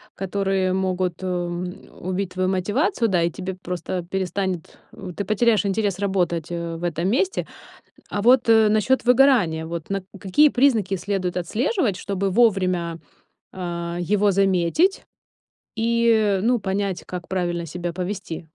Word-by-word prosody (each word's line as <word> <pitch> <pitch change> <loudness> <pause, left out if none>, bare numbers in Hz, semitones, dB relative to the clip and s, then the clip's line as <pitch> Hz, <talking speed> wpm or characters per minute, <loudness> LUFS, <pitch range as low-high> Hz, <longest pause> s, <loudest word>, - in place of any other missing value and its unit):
которые 195 -1 0
могут, 185 -1 -1
м, 180 0 -4 0.2
убить 185 +1 -2
твою 185 0 0
мотивацию, 230 - +1
да, 180 -4 +2
и 170 - +1
тебе 190 +1 -5
просто 180 0 -4
перестанет 185 -1 -3
э, 190 -3 -8
ты 200 - -2
потеряешь 215 +1 +2
интерес 200 -1 0
работать, 180 -5 0
э, 170 -1 -4
в 165 - -8
этом 170 +1 -1
месте. 370 - 0 0.6
А 205 - -2
вот, 245 0 +5
э, 220 -1 +6
насчёт 215 +5 +2
выгорания, 240 -11 +4
вот 165 -1 -6
на 195 -1 -1 0.2
какие 245 +12 +4
признаки 230 -8 +2
следует 185 -1 -2
отслеживать, 220 - 0
чтобы 195 -1 -2
вовремя, 185 -6 +2 0.5
а, 170 -1 -4
его 205 +3 +2
заметить 195 - +2 0.7
и, 225 -3 +2
ну, 240 0 +2
понять, 195 -1 -2
как 180 -1 -7
правильно 175 -2 -2
себя 175 +1 -5
повести? 180 -2 -5
190 Hz, 140 wpm, -23 LUFS, 175-215 Hz, 0.7 s, э